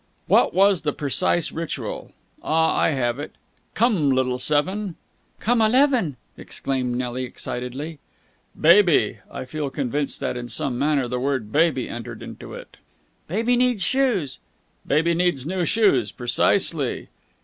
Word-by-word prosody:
"What -, -, +4 dB
was 195 Hz, -1 st, +4 dB
the 150 Hz, -2 st, -1 dB
precise 150 Hz, +3 st, 0 dB
ritual? 165 Hz, 0 st, -5 dB, 0.3 s
Ah! 160 Hz, +1 st, +2 dB
I -, -, +3 dB
have 125 Hz, -3 st, -1 dB
it, 145 Hz, -, -6 dB, 0.4 s
'Come, 205 Hz, -, +2 dB
little 130 Hz, -1 st, +1 dB
seven!'" 180 Hz, +7 st, 0 dB, 0.4 s
"'Come, 235 Hz, +1 st, +2 dB
eleven!'" 235 Hz, -, +3 dB, 0.2 s
exclaimed 125 Hz, -3 st, -2 dB
Nelly 125 Hz, 0 st, -3 dB
excitedly. 130 Hz, +5 st, -6 dB, 0.6 s
"'Baby....' 165 Hz, -, +5 dB
I -, -, -6 dB
feel 145 Hz, +2 st, -4 dB
convinced 140 Hz, +1 st, -2 dB
that 130 Hz, -2 st, -2 dB
in 120 Hz, 0 st, -5 dB
some 120 Hz, +2 st, -1 dB
manner 140 Hz, -3 st, +1 dB
the 125 Hz, +1 st, -3 dB
word 130 Hz, -5 st, -2 dB
baby 150 Hz, -3 st, +2 dB
entered 120 Hz, -1 st, -7 dB
into -, -, -9 dB
it." -, -, -12 dB, 0.5 s
"'Baby 230 Hz, +8 st, +1 dB
needs 250 Hz, 0 st, +2 dB
new 270 Hz, 0 st, +2 dB
shoes!'" 200 Hz, -, 0 dB, 0.5 s
"'Baby 165 Hz, +4 st, +2 dB
needs 170 Hz, -6 st, 0 dB
new 180 Hz, +1 st, -1 dB
shoes!' 205 Hz, -, +2 dB
Precisely!" 120 Hz, +2 st, 0 dB
150 Hz, 140 wpm, -23 LUFS, 130-185 Hz, 0.6 s, Baby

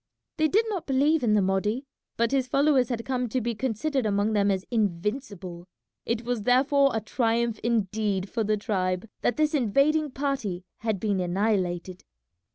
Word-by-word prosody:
They 310 Hz, -1 st, +3 dB
did 430 Hz, +8 st, +2 dB
not 380 Hz, -6 st, -4 dB
believe 290 Hz, +3 st, +3 dB
in 220 Hz, -3 st, +3 dB
the 205 Hz, -, +3 dB
Mahdi, 210 Hz, +7 st, 0 dB, 0.3 s
but 230 Hz, 0 st, +1 dB
his 265 Hz, -2 st, +1 dB
followers 275 Hz, -2 st, +3 dB
had 230 Hz, -2 st, -3 dB
come 250 Hz, -2 st, -1 dB
to 255 Hz, -, 0 dB
be 235 Hz, 0 st, -2 dB
considered 260 Hz, +3 st, -1 dB
among 205 Hz, +1 st, +1 dB
them 205 Hz, -1 st, +2 dB
as 190 Hz, -1 st, -1 dB
invincible. 200 Hz, -3 st, -2 dB, 0.4 s
It 230 Hz, 0 st, -1 dB
was 245 Hz, -2 st, -1 dB
therefore 275 Hz, +4 st, +4 dB
a 220 Hz, -, 0 dB
triumph 230 Hz, 0 st, 0 dB
indeed 210 Hz, -3 st, 0 dB
for 225 Hz, +2 st, -2 dB
the 215 Hz, 0 st, +1 dB
tribe 185 Hz, -2 st, -1 dB
that 245 Hz, -, 0 dB
this 305 Hz, 0 st, +2 dB
invading 290 Hz, +4 st, +2 dB
party 260 Hz, -10 st, -3 dB
had 220 Hz, -3 st, -1 dB
been 205 Hz, -2 st, 0 dB
annihilated. 185 Hz, -1 st, -1 dB
225 Hz, 165 wpm, -26 LUFS, 200-265 Hz, 0.4 s, therefore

